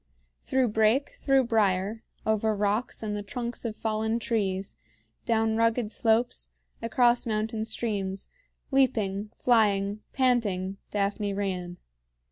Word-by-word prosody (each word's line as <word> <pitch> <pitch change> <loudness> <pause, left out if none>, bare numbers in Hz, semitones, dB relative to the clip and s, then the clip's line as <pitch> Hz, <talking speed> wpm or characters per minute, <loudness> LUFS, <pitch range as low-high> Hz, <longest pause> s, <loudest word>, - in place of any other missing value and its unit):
Through 260 -2 +1
brake, 220 +6 +3
through 270 -1 +2
brier, 215 -2 +1 0.2
over 220 0 +1
rocks 210 +4 0
and 210 -1 -2
the 205 - -3
trunks 235 +4 -5
of 220 -2 -2
fallen 220 +1 -1
trees, 200 -4 -1 0.5
down 225 -2 +2
rugged 230 -1 +1
slopes, 230 +2 +1 0.3
across 240 +1 +3
mountain 220 0 -1
streams, 200 -4 -2 0.4
leaping, 215 -7 +1
flying, 205 -4 +2
panting, 205 -8 +1
Daphne 205 0 -1
ran. 180 -3 -3
220 Hz, 110 wpm, -27 LUFS, 200-230 Hz, 0.5 s, brake